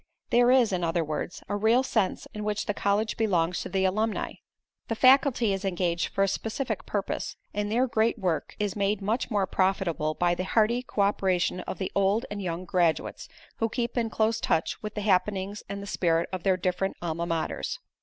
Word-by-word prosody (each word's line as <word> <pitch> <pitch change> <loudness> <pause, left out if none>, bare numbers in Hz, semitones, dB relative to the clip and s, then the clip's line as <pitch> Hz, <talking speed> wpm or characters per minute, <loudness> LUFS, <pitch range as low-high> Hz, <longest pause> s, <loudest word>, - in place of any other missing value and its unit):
There 245 0 +5
is, 250 -4 +5
in 180 -1 -1
other 165 0 +1
words, 155 +3 -4
a 205 - -2
real 225 +5 +3
sense 220 -7 0
in 210 - -5
which 210 0 -1
the 205 - -1
college 205 +2 0
belongs 180 -6 +1
to - - -5
the 190 -1 +1
alumni. 215 +4 0 0.6
The 225 - -1
faculty 255 -3 +5
is 195 +1 -3
engaged 175 -3 0
for 195 - 0
a - - +3
specific 225 +3 -3
purpose 200 -2 -3 0.2
and 205 0 -2
their 245 +4 +3
great 230 -1 +1
work 175 -7 -2
is 205 -2 -1
made 200 0 +1
much 220 +6 0
more 205 -4 +1
profitable 185 -5 0
by 175 -1 +2
the 180 - -2
hearty 225 +5 +2
co 230 -4 -2
operation 185 -3 +1
of - - -4
the 190 - -3
old 200 +3 +2
and 205 0 -4
young 180 -1 -3
graduates 175 -3 0 0.3
who 225 - 0
keep 240 +1 -2
in 230 -2 0
close 220 +1 +1
touch 165 0 0
with 210 -1 -6
the 210 - -2
happenings 200 0 0
and 200 0 -5
the - - -6
spirit 170 -3 +1
of 185 - -3
their 190 +1 +2
different 185 +2 -1
alma 170 0 -3
maters. 165 -2 -2
200 Hz, 200 wpm, -27 LUFS, 180-220 Hz, 0.6 s, There